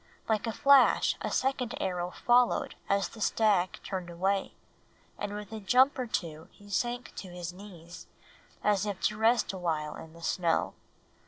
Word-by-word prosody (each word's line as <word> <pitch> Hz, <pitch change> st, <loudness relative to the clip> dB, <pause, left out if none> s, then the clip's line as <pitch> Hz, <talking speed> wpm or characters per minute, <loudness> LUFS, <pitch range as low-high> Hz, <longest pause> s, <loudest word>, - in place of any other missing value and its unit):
Like 220 Hz, 0 st, 0 dB
a -, -, 0 dB
flash 275 Hz, +3 st, +5 dB
a -, -, -2 dB
second 260 Hz, -2 st, -1 dB
arrow 180 Hz, -1 st, -2 dB
followed 245 Hz, +5 st, +2 dB, 0.2 s
as 200 Hz, -2 st, +1 dB
the 220 Hz, -, -12 dB
stag 205 Hz, -5 st, +2 dB
turned 185 Hz, -3 st, -5 dB
away, 190 Hz, +3 st, -1 dB, 0.6 s
and 205 Hz, -, -4 dB
with 210 Hz, 0 st, -7 dB
a 220 Hz, -, -5 dB
jump 255 Hz, +7 st, +4 dB
or 250 Hz, -, -2 dB
two 160 Hz, -7 st, -4 dB
he 205 Hz, 0 st, -16 dB
sank 240 Hz, +4 st, -2 dB
to 190 Hz, -, -6 dB
his 175 Hz, -1 st, -6 dB
knees, 180 Hz, -3 st, -12 dB, 0.6 s
as 210 Hz, 0 st, +2 dB
if 200 Hz, -2 st, -3 dB
to 210 Hz, -, 0 dB
rest 225 Hz, -1 st, +3 dB
awhile 160 Hz, -5 st, -2 dB
in 160 Hz, 0 st, -11 dB
the 170 Hz, 0 st, -14 dB
snow. 170 Hz, 0 st, 0 dB
200 Hz, 165 wpm, -29 LUFS, 175-225 Hz, 0.6 s, flash